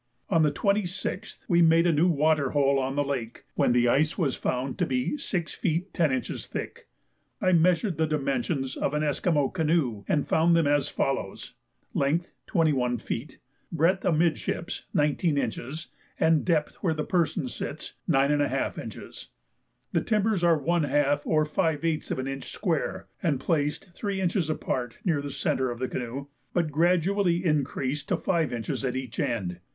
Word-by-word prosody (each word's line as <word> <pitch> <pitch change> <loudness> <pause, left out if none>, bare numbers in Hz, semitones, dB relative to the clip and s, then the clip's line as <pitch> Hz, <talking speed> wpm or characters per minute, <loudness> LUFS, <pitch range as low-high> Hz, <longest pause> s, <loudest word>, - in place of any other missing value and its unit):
On 165 -3 +4
the 150 -2 +4
26th 200 +3 -2
we 175 -1 +4
made 165 0 +5
a 175 - +4
new 160 +3 +3
water 155 -3 +2
hole 140 -1 +3
on 135 +1 -2
the 145 - +2
lake, 125 -5 -4
when - - +2
the 120 0 +3
ice 150 +6 +2
was 145 -8 +1
found 130 +1 -2
to - - +3
be 130 - 0
6 185 - -3
feet 180 +1 -2
10 160 -5 +2
inches 130 -1 -3
thick. - - -6 0.5
I 185 - +2
measured 175 +1 +3
the 160 0 +2
dimensions 135 -2 -1
of 145 - -1
an 150 - +1
Esquimaux 145 -1 +1
canoe, 155 - 0
and 145 - +1
found 170 +1 +4
them 165 -2 +3
as 145 0 +2
follows: 115 -8 -2 0.4
length 155 +5 0
21 135 -8 +2
feet, 120 +4 -5 0.3
breadth 170 +4 +2
amidships 165 0 0
19 150 +1 +2
inches, 140 +4 -3 0.3
and 160 -2 +4
depth 160 -4 0
where 165 -4 0
the 155 - -1
person 170 -4 0
sits 145 +4 -6 0.2
9½ 145 0 +1
inches. - - -9 0.6
The - - +2
timbers 215 -4 +1
are 170 -2 +5
one 170 +4 +1
half 145 0 +1
or 155 -1 +3
five 160 0 0
eighths 160 -2 -1
of - - -1
an 130 0 -3
inch 135 0 -5
square, 170 -7 -2 0.2
and 155 -8 +1
placed 150 +4 -1
three 200 +1 -3
inches 180 -3 0
apart 125 -6 -2
near 160 -6 +2
the 145 - -5
centre 130 -1 0
of 120 - -4
the 130 +1 -2
canoe, 125 +3 -4 0.3
but 170 -4 +1
gradually 175 +3 +2
increased 145 -2 -1
to - - +2
five 165 -6 0
inches 115 +2 -3
at 130 -1 -1
each 130 -3 -5
end. 115 -11 -1
150 Hz, 170 wpm, -27 LUFS, 135-170 Hz, 0.6 s, made